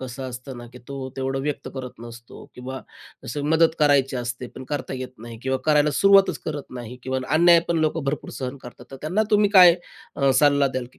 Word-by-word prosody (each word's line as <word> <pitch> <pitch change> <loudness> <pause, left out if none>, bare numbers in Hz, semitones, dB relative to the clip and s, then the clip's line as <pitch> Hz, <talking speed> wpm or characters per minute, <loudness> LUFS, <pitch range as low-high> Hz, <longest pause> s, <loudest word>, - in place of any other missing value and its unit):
कसं 130 0 -6
असतं 125 +1 -8
ना, 120 - -10
की 125 - -12
तो 135 -1 -6
तेवढं 135 0 -2
व्यक्त 145 -1 -4
करत 130 -3 -8
नसतो 115 0 -12
किंवा 130 +1 -7 0.4
असं 145 -1 -4
मदत 160 0 +4
करायची 140 -3 +3
असते, 120 +1 -5
पण 130 - -11
करता 145 -2 -4
येत 130 0 -7
नाही 115 0 -10
किंवा 130 0 -1
करायला 150 0 +4
सुरुवातच 195 0 +5
करत 145 -3 -5
नाही 120 +2 -9
किंवा 130 0 -2 0.2
अन्याय 170 0 +6
पण 170 -1 +1
लोकं 155 -1 -1
भरपूर 140 +1 -3
सहन 130 +1 -4
करतात. 125 0 -12
तर 135 - -8
त्यांना 180 +8 0
तुम्ही 210 -1 +3
काय 180 -4 +8 0.4
अ, 140 -1 +2
सल्ला 145 -1 +4
अ, - - 0
द्याल, 130 -1 -4
की - - -25
135 Hz, 215 wpm, -23 LUFS, 125-155 Hz, 0.4 s, काय